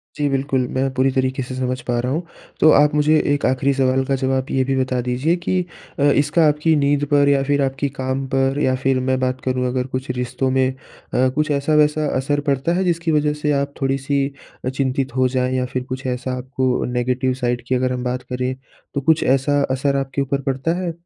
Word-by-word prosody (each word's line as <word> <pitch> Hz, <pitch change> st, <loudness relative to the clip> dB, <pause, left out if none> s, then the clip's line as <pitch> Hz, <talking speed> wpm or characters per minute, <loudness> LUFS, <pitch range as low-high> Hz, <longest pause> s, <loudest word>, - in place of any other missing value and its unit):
जी, 145 Hz, -, 0 dB
बिल्कुल। 135 Hz, -1 st, 0 dB
मैं 135 Hz, +1 st, +1 dB
पूरी 130 Hz, +1 st, +2 dB
तरीके 130 Hz, 0 st, -1 dB
से 130 Hz, +1 st, -7 dB
समझ 130 Hz, 0 st, -2 dB
पा 120 Hz, -1 st, 0 dB
रहा 125 Hz, +2 st, -1 dB
हूँ। 155 Hz, +5 st, 0 dB, 0.4 s
तो 155 Hz, -, +6 dB
आप 150 Hz, 0 st, +5 dB
मुझे 150 Hz, +1 st, +4 dB, 0.2 s
एक 145 Hz, -, -1 dB
आख़िरी 130 Hz, +2 st, +2 dB
सवाल 130 Hz, -1 st, +2 dB
का 135 Hz, 0 st, 0 dB
जवाब 130 Hz, 0 st, 0 dB
ये 130 Hz, -, +2 dB
भी 135 Hz, +1 st, -1 dB
बता 130 Hz, -1 st, 0 dB
दीजिए 125 Hz, +7 st, 0 dB
कि 180 Hz, +1 st, -1 dB, 0.4 s
अ, -, -, +2 dB
इसका 145 Hz, +3 st, +3 dB
आपकी 150 Hz, +2 st, +2 dB
नींद 145 Hz, 0 st, +2 dB
पर 145 Hz, -1 st, +4 dB
या 140 Hz, -1 st, +3 dB
फिर 145 Hz, +1 st, +1 dB
आपकी 135 Hz, +1 st, -1 dB
काम 130 Hz, +1 st, -2 dB
पर 135 Hz, +1 st, +1 dB
या 130 Hz, -3 st, +2 dB
फिर 135 Hz, -1 st, +2 dB
मैं 130 Hz, 0 st, +1 dB
बात 130 Hz, 0 st, -1 dB
करूँ 130 Hz, -1 st, 0 dB
अगर 125 Hz, 0 st, -1 dB
कुछ 130 Hz, 0 st, -5 dB
रिश्तों 125 Hz, +1 st, -1 dB
में 130 Hz, 0 st, +2 dB, 0.4 s
अ, 130 Hz, +1 st, +3 dB
कुछ 150 Hz, +1 st, 0 dB
ऐसा 145 Hz, +2 st, 0 dB
वैसा 150 Hz, 0 st, +3 dB
असर 145 Hz, +2 st, 0 dB
पड़ता 140 Hz, +4 st, +1 dB
है 190 Hz, -, +1 dB
जिसकी 170 Hz, -2 st, 0 dB
वजह 150 Hz, -1 st, +2 dB
से 150 Hz, -, +1 dB
आप 140 Hz, 0 st, -4 dB
थोड़ी-सी 135 Hz, +1 st, 0 dB, 0.4 s
अ, -, -, +1 dB
चिंतित 130 Hz, -1 st, -2 dB
हो 130 Hz, 0 st, +3 dB
जाएँ? 130 Hz, 0 st, -1 dB
या 130 Hz, 0 st, 0 dB
फिर 125 Hz, 0 st, -3 dB
कुछ 130 Hz, +1 st, -6 dB
ऐसा 125 Hz, +1 st, -3 dB
आपको 130 Hz, 0 st, -1 dB
नेगेटिव 125 Hz, +1 st, 0 dB
साइड 120 Hz, -1 st, -1 dB
की 130 Hz, -, +1 dB
अगर 130 Hz, 0 st, 0 dB
हम 125 Hz, 0 st, -4 dB
बात 125 Hz, 0 st, -2 dB
करें 125 Hz, +1 st, -2 dB, 0.4 s
तो 140 Hz, -, -1 dB
कुछ 160 Hz, +3 st, +3 dB
ऐसा 135 Hz, +2 st, +2 dB
असर 140 Hz, +1 st, 0 dB
आपके 135 Hz, 0 st, -2 dB
ऊपर 140 Hz, +1 st, -1 dB
पड़ता 135 Hz, +4 st, -1 dB
है? 180 Hz, -2 st, -2 dB
135 Hz, 220 wpm, -20 LUFS, 130-145 Hz, 0.4 s, तो